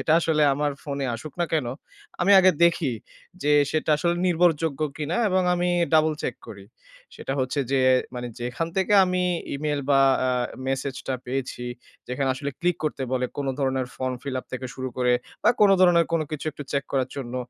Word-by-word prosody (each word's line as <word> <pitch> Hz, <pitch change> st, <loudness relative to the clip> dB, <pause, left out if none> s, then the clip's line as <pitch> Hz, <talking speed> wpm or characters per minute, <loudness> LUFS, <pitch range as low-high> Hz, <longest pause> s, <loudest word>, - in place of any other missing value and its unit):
যেটা 155 Hz, -, +1 dB
আসলে 160 Hz, -2 st, +1 dB
আমার 145 Hz, +1 st, 0 dB
ফোনে 140 Hz, -1 st, -3 dB
আসুক 135 Hz, +6 st, -8 dB
না -, -, +3 dB
কেন 155 Hz, -6 st, +1 dB, 0.5 s
আমি 195 Hz, +3 st, +4 dB
আগে 185 Hz, 0 st, +6 dB
দেখি 170 Hz, -5 st, +2 dB, 0.5 s
যে 150 Hz, -, +2 dB, 0.2 s
সেটা 155 Hz, 0 st, -1 dB
আসলে 170 Hz, +3 st, 0 dB
নির্ভরযোগ্য 165 Hz, -4 st, +1 dB, 0.2 s
কিনা 155 Hz, +2 st, -2 dB
এবং 185 Hz, 0 st, +2 dB
আমি 175 Hz, 0 st, 0 dB, 0.3 s
ডাবল 155 Hz, 0 st, +4 dB
চেক 125 Hz, -, -2 dB
করি। 100 Hz, -2 st, -10 dB, 0.5 s
সেটা -, -, -5 dB
হচ্ছে 130 Hz, +3 st, -1 dB
যে 135 Hz, -, +3 dB, 0.3 s
মানে 125 Hz, 0 st, -4 dB
যেখান 125 Hz, +7 st, -2 dB
থেকে 190 Hz, +1 st, +1 dB
আমি 180 Hz, 0 st, 0 dB, 0.3 s
ইমেইল 145 Hz, 0 st, -2 dB
বা 135 Hz, -1 st, +5 dB, 0.3 s
আ -, -, +1 dB, 0.4 s
মেসেজটা 135 Hz, 0 st, -3 dB
পেয়েছি, 125 Hz, -1 st, -4 dB, 0.4 s
যেখানে 130 Hz, +2 st, -1 dB
আসলে 140 Hz, +2 st, -4 dB
ক্লিক 175 Hz, -1 st, +1 dB
করতে 150 Hz, -3 st, -2 dB
বলে, 125 Hz, -1 st, +1 dB
কোন 140 Hz, -, -3 dB
ধরনের 130 Hz, -2 st, 0 dB
ফর্ম 130 Hz, 0 st, -2 dB
ফিল 140 Hz, -2 st, -4 dB
আপ -, -, -24 dB
থেকে 130 Hz, 0 st, -4 dB
শুরু 130 Hz, 0 st, -4 dB
করে 125 Hz, -1 st, +2 dB, 0.3 s
বা -, -, +5 dB
কোন 205 Hz, -1 st, +7 dB
ধরনের 175 Hz, -2 st, +5 dB
কোন 165 Hz, -, +2 dB
কিছু 155 Hz, 0 st, -5 dB
একটু 145 Hz, -, -8 dB
চেক 140 Hz, -1 st, 0 dB
করার 130 Hz, -2 st, 0 dB
জন্য। 125 Hz, -3 st, -5 dB
145 Hz, 185 wpm, -24 LUFS, 130-165 Hz, 0.5 s, কোন